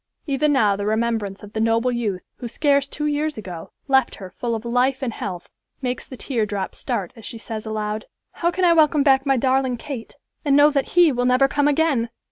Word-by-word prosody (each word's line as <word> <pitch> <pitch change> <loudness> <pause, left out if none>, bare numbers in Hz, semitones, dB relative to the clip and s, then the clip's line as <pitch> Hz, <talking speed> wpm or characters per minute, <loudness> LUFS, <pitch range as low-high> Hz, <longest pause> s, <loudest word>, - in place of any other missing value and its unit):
Even 290 +1 +1
now 215 -8 +3
the 200 +1 -3
remembrance 220 -3 -1
of 205 0 -11
the 220 - -2
noble 230 +2 +2
youth, 215 -6 -2
who 245 - -6
scarce 280 +2 +1
two 300 - -4
years 300 0 -1
ago, 180 -6 -8 0.2
left 265 -2 +3
her 190 -2 -10
full 235 +4 -3
of 225 +1 -6
life 250 +3 +1
and 240 -3 -2
health, 180 -5 -6 0.3
makes 250 -2 -3
the 260 - -9
tear 240 -4 -1
drop 205 -2 -3
start 185 -4 -3
as 225 - -13
she 230 - -6
says 220 -1 -6
aloud, 215 0 -3 0.3
"How 340 - 0
can 365 +1 0
I 340 - +6
welcome 305 -3 +4
back 270 -1 +3
my 270 -1 +3
darling 260 0 +1
Kate, 245 -2 -7 0.3
and 285 -3 +3
know 290 +1 +6
that 280 +2 -2
he 345 -3 +7
will 245 -1 -1
never 255 +2 +4
come 290 +1 +1
again!" 290 -6 +2
250 Hz, 220 wpm, -22 LUFS, 220-280 Hz, 0.3 s, he